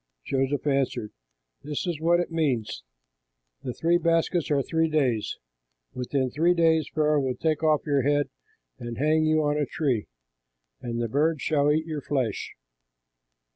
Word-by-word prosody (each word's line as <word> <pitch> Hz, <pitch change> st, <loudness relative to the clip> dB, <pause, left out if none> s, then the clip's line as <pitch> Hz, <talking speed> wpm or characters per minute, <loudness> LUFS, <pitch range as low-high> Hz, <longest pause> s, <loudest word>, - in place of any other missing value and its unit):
Joseph 135 Hz, +2 st, -1 dB
answered, 135 Hz, -6 st, 0 dB, 0.5 s
"This 150 Hz, +3 st, -4 dB
is 170 Hz, -4 st, -3 dB
what 170 Hz, +1 st, +3 dB
it 175 Hz, -, -2 dB
means: 130 Hz, -10 st, -1 dB, 0.8 s
the 125 Hz, -, -4 dB
three 170 Hz, +7 st, +1 dB
baskets 165 Hz, 0 st, +1 dB
are 140 Hz, -2 st, +2 dB
three 160 Hz, +2 st, 0 dB
days; 130 Hz, -8 st, 0 dB, 0.6 s
within 130 Hz, +1 st, -1 dB
three 170 Hz, +6 st, +2 dB
days 160 Hz, -3 st, +3 dB
Pharaoh 150 Hz, -1 st, +2 dB
will 130 Hz, -2 st, -1 dB
take 155 Hz, -2 st, -1 dB
off 155 Hz, -2 st, +2 dB
your 145 Hz, -3 st, +2 dB
head 145 Hz, +1 st, +1 dB, 0.5 s
and 120 Hz, -1 st, -6 dB
hang 155 Hz, +3 st, +2 dB
you 155 Hz, 0 st, +3 dB
on 145 Hz, 0 st, +1 dB
a 145 Hz, -, 0 dB
tree, 130 Hz, -9 st, -1 dB, 0.7 s
and 120 Hz, -1 st, -4 dB
the 120 Hz, -, 0 dB
birds 150 Hz, +5 st, +1 dB
shall 145 Hz, -2 st, +2 dB
eat 155 Hz, +1 st, +1 dB
your 155 Hz, -3 st, -4 dB
flesh." 130 Hz, -7 st, -2 dB
150 Hz, 155 wpm, -26 LUFS, 135-160 Hz, 0.8 s, what